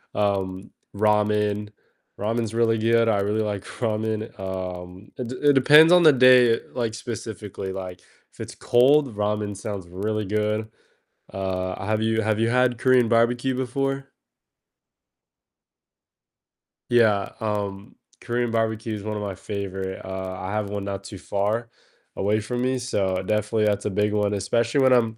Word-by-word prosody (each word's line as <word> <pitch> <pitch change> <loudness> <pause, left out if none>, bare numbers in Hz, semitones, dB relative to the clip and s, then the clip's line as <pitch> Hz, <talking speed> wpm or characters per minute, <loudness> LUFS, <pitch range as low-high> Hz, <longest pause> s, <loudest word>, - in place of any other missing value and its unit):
um, 95 -2 -1 0.2
ramen; 105 0 +1 0.5
ramen's 115 +1 -2
really 115 -1 +2
good, 115 +1 +3
I 100 -2 +2
really 105 +2 0
like 100 -2 -3
ramen, 110 -1 -3
um, 90 0 -6
it 125 -2 -4
d 130 - -6
it - - +6
depends 150 +5 +7
on 180 -1 +6
the 155 -2 +8
day, 125 -2 +6
like, 115 -3 -2
specifically, 105 -5 -6
like, 90 -2 -7 0.3
if - - -25
it's - - -7
cold, 130 0 +3
ramen 105 -1 -2
sounds 100 -3 -6
really 105 +3 -3
good, 105 +2 -1 0.7
uh, 95 0 -3
have 110 +1 0
you 110 0 +1
have 110 0 0
you 115 - +2
had 125 -1 +2
Korean 125 -2 +4
barbecue 120 +3 +2
before? 135 +2 -2 2.8
Yeah, 110 -5 +3
um, 105 0 -4 0.3
Korean 120 -1 -1
barbecue 110 -1 -1
is 100 - -7
one 105 0 -4
of 105 - -4
my 100 -2 -4
favorite, 95 -1 -5
uh, 95 0 -5
I 95 +2 -5
have 105 -1 -2
one 100 -1 -4
not 100 -1 -5
too 100 - -9
far 105 +5 -2 0.5
away 105 +2 +1
from 120 +3 -4
me, 130 0 0
so 95 -7 -1
definitely 105 +2 0
that's 105 -1 0
a - - +1
big 105 +2 0
one, 105 -1 +1
especially 115 +7 0
when 130 -1 +5
I'm 115 -2 +2
105 Hz, 155 wpm, -24 LUFS, 100-115 Hz, 2.8 s, the